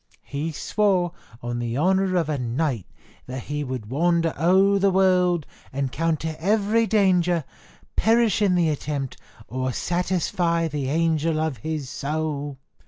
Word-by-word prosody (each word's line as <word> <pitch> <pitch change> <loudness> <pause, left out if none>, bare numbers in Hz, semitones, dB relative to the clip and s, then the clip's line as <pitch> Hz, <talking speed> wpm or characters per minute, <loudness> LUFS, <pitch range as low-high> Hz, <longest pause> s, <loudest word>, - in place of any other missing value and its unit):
He 145 +3 -3
swore, 185 +1 +1 0.3
on 120 0 -3
the 120 0 -2
honour 190 +3 +2
of 170 -4 +1
a 150 -3 -1
knight, 125 - -1 0.4
that 130 -1 -5
he 150 0 -3
would 125 -5 -5
wander 165 +2 +2
o'er 190 +5 +4
the 200 +1 +4
world, 180 -3 +3 0.3
encounter 155 +4 -1
every 215 +5 +2
danger, 180 -6 +3 0.5
perish 225 -2 +3
in 195 -3 +3
the 170 -2 +3
attempt, 145 -2 -3 0.3
or 130 +3 -2
satisfy 175 +1 0
the 145 -3 -3
angel 160 0 +1
of 155 -4 -1
his 155 +3 -4
soul." 145 0 -3
160 Hz, 135 wpm, -24 LUFS, 140-180 Hz, 0.5 s, o'er